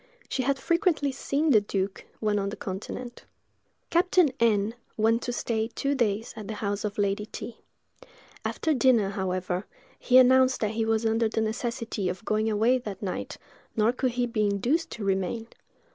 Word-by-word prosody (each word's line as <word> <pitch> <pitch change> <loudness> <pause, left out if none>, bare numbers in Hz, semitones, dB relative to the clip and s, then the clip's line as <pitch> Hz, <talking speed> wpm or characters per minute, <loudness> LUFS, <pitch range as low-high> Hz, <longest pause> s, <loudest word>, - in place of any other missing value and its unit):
She 265 - -1
had 275 +2 +1
frequently 335 -2 +1
seen 285 +3 0
the 215 -5 +6
duke, 195 -1 -3
when 210 -1 +1
on 200 0 -1
the 205 - -5
continent. 220 +6 -6 0.7
Captain 350 -3 +4
N—— 220 -2 +2 0.2
went 225 +2 +3
to 245 - -3
stay 225 -2 -1
two 275 +4 -2
days 225 -4 0
at 210 -2 -8
the 220 - -4
house 205 -1 -2
of 205 -1 -3
Lady 205 +1 0
T——. 230 - -7 0.9
After 320 - 0
dinner, 245 -7 +3
however, 185 -1 -2 0.3
he 255 - +4
announced 260 0 +6
that 215 -1 +1
he 220 0 -1
was 225 0 +1
under 225 0 +2
the 220 - -1
necessity 220 -3 -2
of 185 +5 -6
going 215 +1 +1
away 225 +4 +3
that 210 -5 -7
night, 185 - -4 0.4
nor 225 +1 +3
could 255 -1 -1
he 245 0 +1
be 215 -3 0
induced 260 - 0
to 215 - -6
remain. 195 +3 -1
225 Hz, 175 wpm, -27 LUFS, 205-255 Hz, 0.9 s, the